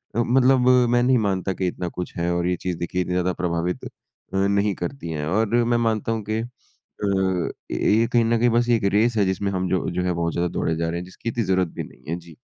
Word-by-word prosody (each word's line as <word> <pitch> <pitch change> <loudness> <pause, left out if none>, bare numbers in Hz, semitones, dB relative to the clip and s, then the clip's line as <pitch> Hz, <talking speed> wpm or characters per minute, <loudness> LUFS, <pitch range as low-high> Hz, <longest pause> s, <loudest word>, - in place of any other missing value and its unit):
अ, - - +1
मतलब 125 +1 +4
अ, 125 -1 +5
मैं 120 0 +3
नहीं 130 +1 +4
मानता 95 -3 0
कि 95 0 -2
इतना 90 0 -3
कुछ 90 - -5
है 85 +1 0
और 85 0 0
ये 90 - +1
चीज़ 90 -2 -2
देखिए 85 +2 -2
इतनी 90 - -2
ज़्यादा 90 0 +1
प्रभावित 90 0 -2 0.4
नहीं 100 +1 +2
करती 90 +2 -5
है 75 -2 -3
और 110 +5 +2 0.2
मैं 120 0 +2
मानता 115 -1 0
हूँ 115 -1 -1
कि 110 +1 0
अ, 120 +2 -12 1.0
ये 115 +2 +2
कहीं 120 -1 +5
न 115 +1 +2
कहीं 120 +1 +4
बस 120 +1 +2
1 115 -3 +3
रेस 115 +3 +3
है 100 - +3
जिसमें 95 +1 -1
हम 95 -1 -1
जो 95 -1 0
जो 90 +1 -1
है 90 0 0
बहुत 85 -1 -1
ज़्यादा 85 +1 0
दौड़े 80 - 0
जा 80 0 -1
रहे 85 - -2
हैं, 90 - -7
जिसकी 95 +5 -6
इतनी 115 0 -1
ज़रूरत 95 -2 +1
भी - - -6
नहीं - - -15
है। 85 - 0
जी। 85 -2 -15
95 Hz, 250 wpm, -23 LUFS, 90-115 Hz, 1.0 s, अ